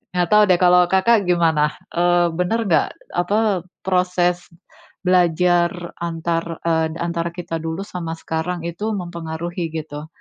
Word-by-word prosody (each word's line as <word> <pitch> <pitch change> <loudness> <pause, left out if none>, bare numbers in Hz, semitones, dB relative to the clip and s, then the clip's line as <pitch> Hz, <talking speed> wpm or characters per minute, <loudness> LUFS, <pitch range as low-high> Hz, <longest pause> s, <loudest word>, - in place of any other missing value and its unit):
Enggak 175 -1 +1
tahu 210 0 +7
deh, 180 - +5
kalau 180 0 +6
Kakak 200 +3 +4
gimana? 160 -4 +2 0.2
Eee, 175 0 +3
benar 220 +6 0
enggak, 160 -4 +3 0.3
apa, 200 +1 +1 0.2
proses 180 -1 +1 0.6
belajar 175 0 +2
antar, 165 0 -2
eee, 160 -1 +1
antara 170 0 -2
kita 165 -2 -4
dulu 165 +3 -4
sama 165 -2 -5
sekarang 165 +2 -3
itu 205 +6 -3
mempengaruhi, 170 -1 -4
gitu? 155 -1 -6
175 Hz, 130 wpm, -21 LUFS, 165-180 Hz, 0.6 s, tahu